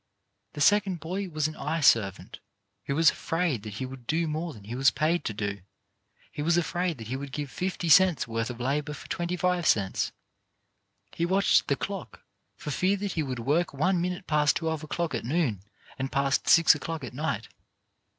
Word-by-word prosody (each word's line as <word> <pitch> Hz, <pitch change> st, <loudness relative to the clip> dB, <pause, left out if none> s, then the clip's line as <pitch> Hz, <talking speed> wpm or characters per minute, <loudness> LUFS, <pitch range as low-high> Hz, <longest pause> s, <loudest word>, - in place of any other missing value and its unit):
The 150 Hz, -, -6 dB
second 200 Hz, 0 st, +3 dB
boy 185 Hz, +4 st, -4 dB
was 155 Hz, -2 st, 0 dB
an 155 Hz, -, -7 dB
eye 160 Hz, +2 st, -2 dB
servant 110 Hz, -8 st, +2 dB, 0.5 s
who 140 Hz, -, -1 dB
was 165 Hz, +1 st, +6 dB
afraid 165 Hz, -, -1 dB
that 105 Hz, -1 st, -8 dB
he 130 Hz, -, -3 dB
would 130 Hz, -2 st, -10 dB
do 165 Hz, +1 st, +1 dB
more 160 Hz, +2 st, -3 dB
than 105 Hz, -8 st, -13 dB
he 110 Hz, +4 st, -7 dB
was 135 Hz, +3 st, +4 dB
paid 165 Hz, +3 st, 0 dB
to -, -, -1 dB
do 100 Hz, -1 st, -3 dB, 0.3 s
— -, -, -35 dB
he -, -, -5 dB
was 165 Hz, +3 st, +2 dB
afraid 175 Hz, -1 st, -1 dB
that 110 Hz, -2 st, -9 dB
he 130 Hz, -, -2 dB
would 140 Hz, 0 st, -6 dB
give 145 Hz, 0 st, -5 dB
fifty 185 Hz, -1 st, -3 dB
cents' 175 Hz, -1 st, +5 dB
worth 115 Hz, +1 st, -2 dB
of 125 Hz, -1 st, -7 dB
labour 145 Hz, +4 st, -1 dB
for -, -, -11 dB
twenty 175 Hz, 0 st, -2 dB
five 180 Hz, -2 st, +1 dB
cents. 95 Hz, -3 st, +1 dB, 1.0 s
He 170 Hz, -, -2 dB
watched 190 Hz, +3 st, +3 dB
the -, -, +2 dB
clock, -, -, -6 dB, 0.3 s
for 150 Hz, -6 st, -6 dB
fear 190 Hz, +7 st, +1 dB
that 200 Hz, 0 st, -3 dB
he 165 Hz, -, -1 dB
would 130 Hz, -4 st, -3 dB
work 145 Hz, +7 st, 0 dB
one 180 Hz, +5 st, +1 dB
minute 180 Hz, +1 st, -3 dB
past 150 Hz, -2 st, +2 dB
twelve 160 Hz, -2 st, -2 dB
o'clock 165 Hz, +1 st, -2 dB
at 115 Hz, -, -2 dB
noon 125 Hz, -, 0 dB, 0.4 s
and 135 Hz, +1 st, -2 dB
past 140 Hz, 0 st, +1 dB
six 165 Hz, -1 st, +7 dB
o'clock 155 Hz, +1 st, -5 dB
at 125 Hz, -, -7 dB
night. 155 Hz, +5 st, -3 dB
155 Hz, 200 wpm, -27 LUFS, 130-175 Hz, 1.0 s, six